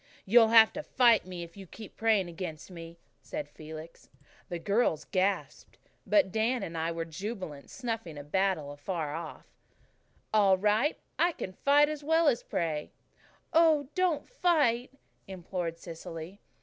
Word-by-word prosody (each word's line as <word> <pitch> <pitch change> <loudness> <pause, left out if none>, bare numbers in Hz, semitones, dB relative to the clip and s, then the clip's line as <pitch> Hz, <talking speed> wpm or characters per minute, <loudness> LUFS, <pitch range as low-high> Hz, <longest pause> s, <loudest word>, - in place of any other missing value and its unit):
"You'll 225 +3 +6
have 225 0 +7
to 300 - -4
fight 240 -9 +3
me, 180 -2 -6
if 170 0 -12
you 195 -2 -10
keep 215 +3 -11
on - - -41
praying 220 -5 +2
against 170 -1 -7
me," 170 -1 -10 0.2
said 300 0 -5
Felix. 155 +1 -11 0.4
The 175 - -3
girls 200 -4 +1
gasped; 195 0 -2 0.3
but 295 -11 +4
Dan 225 +3 0
and 165 -3 -6
I 165 +1 -1
were 165 0 -3
jubilant, 185 -4 -6
snuffing 225 - -5
battle 190 -5 0
afar 150 +1 -4
off. 165 0 -7 0.9
"All 200 -3 +5
right. 210 +9 +2 0.2
I 345 0 +3
can 185 - -6
fight 285 +8 +4
as 300 -1 -5
well 320 +2 +3
as 250 -5 +3
pray." 155 -3 -2 0.6
"Oh, 315 -4 +4
don't 365 -5 0
fight," 295 - +2 0.4
implored 180 -2 -4
Cecily. 165 +2 -8
195 Hz, 150 wpm, -30 LUFS, 165-245 Hz, 0.9 s, have